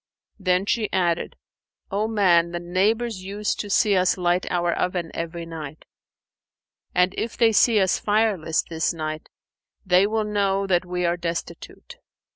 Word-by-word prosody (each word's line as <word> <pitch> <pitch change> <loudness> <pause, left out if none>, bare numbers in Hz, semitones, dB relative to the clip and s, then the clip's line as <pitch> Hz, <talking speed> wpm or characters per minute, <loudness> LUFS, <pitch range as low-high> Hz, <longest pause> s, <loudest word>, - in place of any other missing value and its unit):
Then 185 0 +1
she 215 0 -1
added, 175 -3 0 0.6
"O 205 +2 0
man, 175 -6 +3
the 175 - -2
neighbours 195 +4 0
use 205 +2 -2
to 205 - -6
see 205 0 +3
us 185 +1 +2
light 180 0 0
our 175 -1 +1
oven 180 -2 -2
every 170 0 -5
night; 155 -2 -8 1.1
and, 180 +1 +3
if 230 - -4
they 230 -2 +4
see 220 +1 +4
us 190 -2 +2
fireless 205 -7 +1
this 165 +1 -2
night, 155 -1 -5 0.6
they 185 +1 +4
will 220 +1 0
know 200 -2 0
that 185 -2 +1
we 180 0 -2
are 170 +1 +1
destitute. 170 - -6
185 Hz, 150 wpm, -23 LUFS, 170-205 Hz, 1.1 s, they